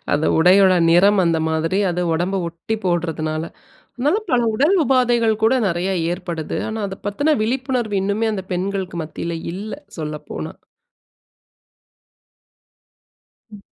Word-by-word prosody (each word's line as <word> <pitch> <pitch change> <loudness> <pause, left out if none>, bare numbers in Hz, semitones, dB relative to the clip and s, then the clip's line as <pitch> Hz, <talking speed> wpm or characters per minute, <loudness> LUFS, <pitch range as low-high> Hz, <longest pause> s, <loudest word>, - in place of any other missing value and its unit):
அந்த 150 +2 +1
உடையுடைய 185 +2 +5
நிறம் 195 +4 +5
அந்த 165 -1 +2
மாதிரி. 160 +4 0
அது 175 +1 -2
உடம்பை 180 +4 -1
ஒட்டி 170 +7 -5
போடுறதனால. 160 -3 -1 0.5
அதனால 295 - +1
பல 245 -1 +3
உடல் 295 - +3
உபாதைகள் 240 -4 +2
கூட 225 +3 +5
நிறைய 175 +1 -1 0.2
ஏற்படுது. 170 -3 -5
ஆனா 220 0 -4
அதைப்பத்துன 205 +11 -1
விழிப்புணர்வு 245 -3 -1
இன்னுமே 205 +3 0
அந்த 190 - -4
பெண்களுக்கு 190 -1 -3
மத்தியில 165 +2 -5 0.2
இல்ல, 205 +4 -6 0.2
சொல்லப்போனா. 150 -1 -6 3.0
ம். 205 -2 -12
195 Hz, 115 wpm, -20 LUFS, 170-225 Hz, 3.0 s, உடையுடைய